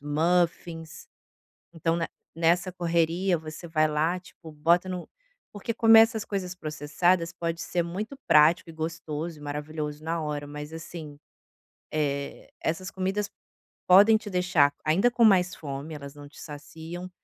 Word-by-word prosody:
muffins, 165 +1 -1 0.7
então 165 0 0
ne 165 - -1 0.3
nessa 170 +2 +2
correria 170 +1 +1
você 155 +2 -9
vai 155 -1 +2
lá, 160 +4 0
tipo, 165 -3 -14
bota 170 +5 +2
no 180 -1 -5 0.5
porque 205 +3 -4
comer 225 -1 +7
essas 225 -2 +1
coisas 185 -3 -4
processadas 165 +2 0
pode 170 -1 -3
ser 175 0 -1
muito 210 +10 -5
prático 160 +2 +5
e - - -14
gostoso 160 0 -4
e - - -14
maravilhoso 150 +1 -5
na 165 +1 -1
hora, 150 -2 -3
mas, 150 +2 -8
assim, 160 -3 -8 0.7
eh, 140 -2 -2
essas 185 +4 -2
comidas 195 +2 -2 0.6
podem 205 +4 +8
te 215 -1 -8
deixar 180 -6 +3
ainda 185 +10 +4
com 240 -1 +2
mais 185 -4 +4
fome, 145 +1 -6
elas 140 -1 -9
não 145 0 -11
te 145 - -14
saciam 160 +4 -8
165 Hz, 145 wpm, -27 LUFS, 155-180 Hz, 0.7 s, podem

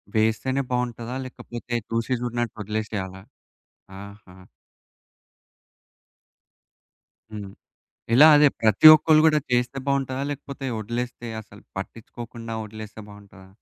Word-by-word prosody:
వేస్తేనే 110 +5 +1
బావుంటదా? 125 -1 -3
లేకపోతే 120 -1 -7
చూసి 115 +3 -1
చూడినట్టు 120 -1 -3
వదిలేసేయాలా? 105 -3 -4 0.8
ఆహా! 100 -2 -14 2.9
హ్మ్. 105 -2 -7 0.6
ఇలా 145 +6 +9
అదే 145 0 +6
ప్రతి 110 +7 +6
ఒక్కళ్ళు 155 0 +4
కూడా 155 -1 +4
చేస్తే 125 +2 0
బాగుంటదా? 135 -1 -1
లేకపోతే 140 -1 -7
వదిలేస్తే 120 +2 -5
అసలు - - -17
పట్టించుకోకుండా 115 0 -8
వదిలేస్తే 110 0 -10
బాగుంటదా? 100 -2 -15
115 Hz, 95 wpm, -24 LUFS, 110-130 Hz, 2.9 s, ఇలా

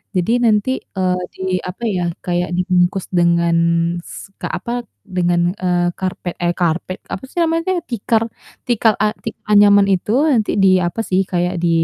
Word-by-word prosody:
Jadi 180 +5 +1
nanti, 215 +2 +3 0.3
eee, 185 -1 +1 0.2
di - - -11 0.2
apa 180 +6 -7
ya, 185 -4 -1 0.2
kayak 175 0 -1
dibungkus 180 +1 +1
dengan 170 -1 +2 0.5
s - - -10
ka - - -2
apa, 240 +1 -3 0.2
dengan, 175 -1 +1
eee, 175 -2 0
karpet 185 -2 -4
eh 175 - +2
karpet, 175 +2 -1
apa 195 - -6
sih - - -5
namanya 330 0 +1
tuh? 360 - +1
Tikar 225 0 +1 0.4
tikar 225 -2 +3
a 210 - +1
tik 225 - -5 0.2
anyaman 205 -1 +6
itu. 190 +2 0 0.2
Nanti 220 -5 +1
di - - +6 0.2
apa 175 +5 -2
sih, 190 +1 +2
kayak 180 +1 0
di 170 - +3
185 Hz, 165 wpm, -18 LUFS, 175-210 Hz, 0.5 s, anyaman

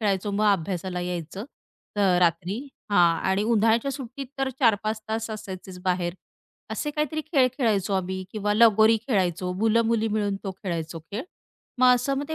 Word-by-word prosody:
खेळायचो, 200 -1 0
मग 205 +2 0
अभ्यासाला 180 0 -3
यायचं 175 +2 -4 0.5
अ, - - 0 0.2
रात्री 175 +4 +1 0.3
हां. 170 -3 +5
आणि 195 +2 +1
उन्हाळ्याच्या 230 +3 +2
सुट्टीत 270 0 -6
तर 270 0 +1
4-5 215 -2 +2
तास 220 0 -2
असायचेच 190 -3 -7
बाहेर. 180 -2 0 0.6
असे 295 - -2
काहीतरी 300 +1 -1
खेळ 280 -5 +2
खेळायचो 210 -6 +1
आम्ही 190 0 -2
किंवा 210 -1 0
लगोरी 220 0 +6
खेळायचो. 180 -5 0
मुलं-मुली 225 +1 +2
मिळून 205 -2 0
तो 195 - -2
खेळायचो 170 -4 -5
खेळ. 200 +9 -6 0.6
मग 255 - +5
असं 270 +3 -1
ते 315 - -2
210 Hz, 150 wpm, -25 LUFS, 185-230 Hz, 0.6 s, लगोरी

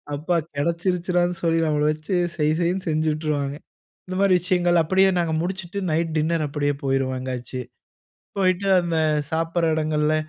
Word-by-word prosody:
அப்பா 160 +5 -1 0.2
கிடைச்சிருச்சுடான்னு 175 +3 0
சொல்லி 165 -1 +2
நம்மள 150 -1 +1
வச்சு 155 +5 -3 0.2
செய் 155 -1 +1
செய்ன்னு 180 +2 0
செஞ்சுட்டுருவாங்க. 155 -2 -1 0.5
இந்த 185 - -5
மாதிரி 195 -2 +4
விஷயங்கள் 175 -1 +2
அப்படியே 190 +4 +3
நாங்க 170 -2 0
முடிச்சுட்டு, 185 +1 -4
நைட் 165 0 0
டின்னர் 160 0 0
அப்படியே 145 0 -1
போயிருவோம் 135 -1 0
எங்கயாச்சு. 125 0 -5 0.8
போயிட்டு 185 0 +1
அந்த 170 -2 -2 0.3
சாப்பிடற 165 0 0
இடங்களில, 155 0 +1
165 Hz, 135 wpm, -23 LUFS, 150-175 Hz, 0.8 s, மாதிரி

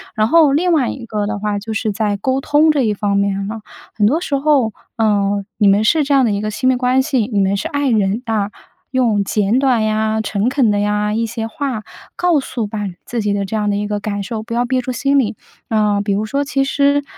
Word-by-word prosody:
然 215 -1 +2
后 315 +1 +5
另 345 +4 +2
外 275 -6 +2
一 250 - -6
个 210 -2 -2
的 210 0 -3
话， 210 0 -1
就 220 +2 -6
是 220 0 -1
在 205 -1 -1
沟 260 +6 -1
通 295 +3 +3
这 290 - +1
一 220 -4 +1
方 200 -1 -1
面 200 0 0
了。 220 0 -6 0.3
很 210 - +2
多 290 +10 +3
时 285 - -1
候， 270 -7 +2 0.2
呃， 205 -2 +1
你 210 - +3
们 200 +2 +4
是 305 +7 +3
这 285 0 0
样 270 -2 +4
的 225 - +1
一 200 0 -1
个 215 0 -2
亲 255 +4 -1
密 260 - +4
关 250 +1 +2
系， 260 -6 0
你 205 - +1
们 195 0 +2
是 200 - -2
爱 285 -1 0
人， 215 0 +1
啊， 215 -3 -1 0.4
用 235 -6 +2
简 210 +4 +1
短 250 -5 +2
呀、 215 0 0
诚 210 +2 -1
恳 260 -5 +2
的 205 - +1
呀 210 0 0
一 230 +1 0
些 225 0 -4
话， 260 -5 -4 0.3
告 350 -4 +2
诉 235 -4 -4
把 215 +1 -5 0.3
自 235 -2 -3
己 205 -1 0
的 200 -1 -1
这 205 - -4
样 210 -1 0
的 200 - 0
一 205 0 -2
个 210 -1 -2
感 205 -1 -3
受， 220 +1 -5
不 230 - -7
要 240 +1 +1
憋 255 +1 0
住 255 - -4
心 275 +3 +1
里。 225 -5 +1 0.3
呃， 210 -2 +2
比 200 -1 0
如 205 +2 -1
说： 280 +6 -1
“其 275 -1 0
实， 285 +1 +2
220 Hz, 270 characters per minute, -18 LUFS, 205-265 Hz, 0.4 s, 后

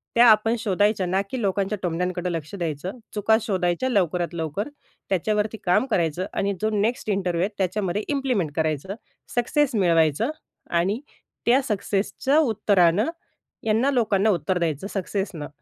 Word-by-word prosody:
त्या 240 +1 +7
आपण 220 +2 +4
शोधायच्या 205 -2 +1
ना, 190 +2 +1
की 260 - -3
लोकांच्या 200 0 0
टोमण्यांकडं 180 +1 -1
लक्ष 160 -1 -5
द्यायचं. 175 - -4
चुका 220 +1 +3
शोधायच्या, 185 +3 0
लवकरात 180 -6 0
लवकर 165 - -3 0.4
त्याच्यावरती 210 +3 0
काम 180 +8 +3
करायचं 170 -1 +1
आणि 200 0 0
जो 215 - +2
नेक्स्ट 215 +2 -1
इंटरव्ह्यू 185 -4 0
आहेत 205 +1 -3
त्याच्यामध्ये 195 +1 -1
इम्प्लिमेंट 255 - 0
करायचं, 160 +4 -1 0.4
सक्सेस 255 +2 +1
मिळवायचं 165 - +3 0.4
आणि 185 +7 +1 0.5
त्या 255 +4 +5
सक्सेसच्या 215 +4 0
उत्तरानं 205 - +3 0.6
यांना 230 +6 +3
लोकांना 220 -5 +2
उत्तर 180 0 +1
द्यायचं 165 +2 -1
सक्सेसनं, 190 -5 -3
195 Hz, 135 wpm, -24 LUFS, 175-220 Hz, 0.6 s, त्या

